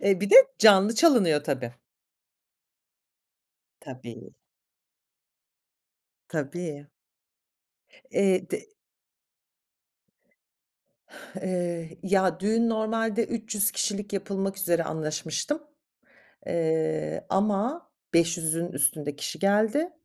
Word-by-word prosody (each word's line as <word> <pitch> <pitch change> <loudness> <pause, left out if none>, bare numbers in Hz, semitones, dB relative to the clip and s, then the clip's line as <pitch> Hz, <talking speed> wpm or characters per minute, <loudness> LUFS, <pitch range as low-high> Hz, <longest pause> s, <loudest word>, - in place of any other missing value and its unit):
Eee, 195 -2 +2
bir 205 - -2
de 455 - +9 0.2
canlı 205 0 +6
çalınıyor, 215 - +4
tabii. 130 -6 -3 2.1
Tabii. 120 -3 -11 1.9
Tabii. 150 -1 -5 1.2
Eee, 190 -2 +1
te 425 +1 -7 2.7
Eee, 175 -3 -4
ya 190 -3 +1
düğün 225 +4 +1
normalde 225 0 -1
300 220 -2 -1
kişilik 205 -2 -3
yapılmak 195 0 -3
üzere 175 -3 +1
anlaşmıştım. 160 - -3 0.8
Eee, 160 -1 -1
ama 210 - -1 0.3
500'ün 165 0 +1
üstünde 145 +1 -1
kişi - - -5
geldi. 215 - +1
190 Hz, 75 wpm, -26 LUFS, 160-215 Hz, 2.7 s, de